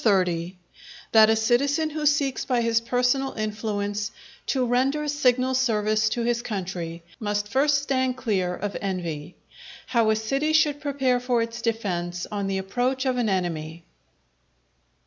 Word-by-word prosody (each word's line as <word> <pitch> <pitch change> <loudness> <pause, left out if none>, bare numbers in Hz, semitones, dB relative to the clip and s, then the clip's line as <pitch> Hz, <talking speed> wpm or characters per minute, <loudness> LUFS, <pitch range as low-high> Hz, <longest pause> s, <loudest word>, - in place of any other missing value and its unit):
—_That 180 -3 +1 0.6
a 220 - +4
Citizen 280 +8 +1
who 300 0 0
seeks 285 -2 +1
by 250 -2 +1
his 230 -1 +2
personal 250 +3 +1
influence 210 -1 -2 0.4
to 260 -2 +1
render 270 +5 +1
signal 260 -3 +2
service 215 -4 +2
to 235 +1 -2
his 235 0 0
Country, 180 -6 -5 0.2
must 205 -1 -1
first 280 +4 +2
stand 260 -2 0
clear 190 -8 0
of 205 +1 -4
Envy. 170 -6 -4 0.5
How 230 -3 +2
a 220 - +4
City 275 +8 0
should 295 -2 +3
prepare 265 -4 +1
for 245 -2 +1
its 230 0 -6
defence 180 -6 -2
on 200 -2 -2
the 195 0 -1
approach 245 +8 -1
of 255 -1 +1
an 235 -3 +1
Enemy. 170 -3 -2
230 Hz, 145 wpm, -25 LUFS, 200-260 Hz, 0.6 s, a